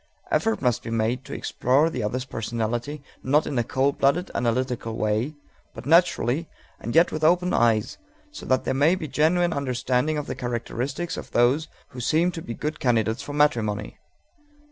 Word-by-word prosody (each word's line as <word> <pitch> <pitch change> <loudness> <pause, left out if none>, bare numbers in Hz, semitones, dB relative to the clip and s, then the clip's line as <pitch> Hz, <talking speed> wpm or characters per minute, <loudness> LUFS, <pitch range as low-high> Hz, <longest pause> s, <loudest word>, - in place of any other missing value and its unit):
Effort 225 -7 +1
must 120 -2 +2
be - - -7
made 115 +3 0
to 140 - -8
explore 135 +6 +2
the 130 -7 -3
other's 125 +5 -2
personality, 120 +4 -3 0.2
not 145 +4 +2
in 145 - -4
a - - +2
cold 135 +4 0
blooded, 170 +7 +2
analytical 120 -1 -1
way, 110 +8 0 0.4
but - - -9
naturally 160 -2 +3 0.3
and 120 - -5
yet 170 +2 +5
with 155 - -4
open 180 +3 +3
eyes, 115 -2 +2 0.3
so - - -9
that 130 0 +2
there - - -1
may 145 +7 +4
be 160 -4 -5
genuine 170 +4 +2
understanding 130 +2 0
of 150 - -3
the - - -4
characteristics 125 +6 -3
of - - -7
those 130 +6 +2 0.2
who 125 - -10
seem 160 +8 +2
to 165 - -7
be 115 -6 -6
good 150 +1 -4
candidates 115 -1 +1
for 145 - -7
matrimony. 115 -8 0
130 Hz, 175 wpm, -25 LUFS, 120-155 Hz, 0.4 s, yet